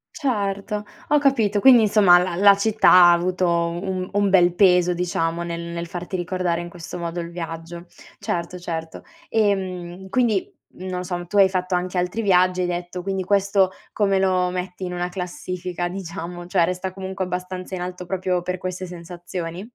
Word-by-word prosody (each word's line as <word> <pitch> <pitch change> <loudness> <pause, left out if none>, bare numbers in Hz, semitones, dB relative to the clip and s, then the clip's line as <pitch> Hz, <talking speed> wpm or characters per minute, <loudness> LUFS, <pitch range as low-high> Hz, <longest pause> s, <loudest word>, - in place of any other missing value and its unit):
Certo, 210 -6 -2 0.3
ho 295 - +5
capito. 225 -8 +2
Quindi 245 -1 +7
insomma 200 -4 +6
la 180 -1 0
la 200 +2 +6
città 215 +1 +3
ha 175 -1 +8
avuto 180 +1 +1
un 175 +2 -1
un 205 0 +1
bel 180 -2 +4
peso 180 -2 +4
diciamo 170 -1 -1
nel 170 0 -4
nel 170 0 -5
farti 180 +1 -6
ricordare 175 -1 -1
in 175 - -7
questo 170 -1 -8
modo 170 0 -4
il 170 0 -5
viaggio. 170 0 -7 0.3
Certo, 170 +1 -3
certo. 165 -2 -6 0.3
Ehm, 190 -3 -1
quindi, 230 -5 +1 0.3
non 185 0 -4
o - - -5
so, 175 -1 -4
tu 205 - -2
hai 195 -1 +6
fatto 185 0 -1
anche 180 +1 -2
altri 180 +6 -2
viaggi, 185 -2 +3
hai 180 - 0
detto, 175 +1 -4
quindi 190 0 -2
questo 195 0 +2 0.2
come 195 -2 +2
lo 185 -1 +2
metti 180 +1 -5
in 180 - -5
una 175 0 -2
classifica, 180 -1 -4
diciamo, 175 -1 -6
cioè, 180 -2 +3
resta 185 +1 -3
comunque 190 0 -4
abbastanza 180 +1 -5
in 180 - -5
alto 180 0 -6
proprio 185 -1 -1
per 180 +1 -3
queste 185 0 -5
sensazioni? 175 +1 -7
180 Hz, 175 wpm, -22 LUFS, 175-190 Hz, 0.3 s, ha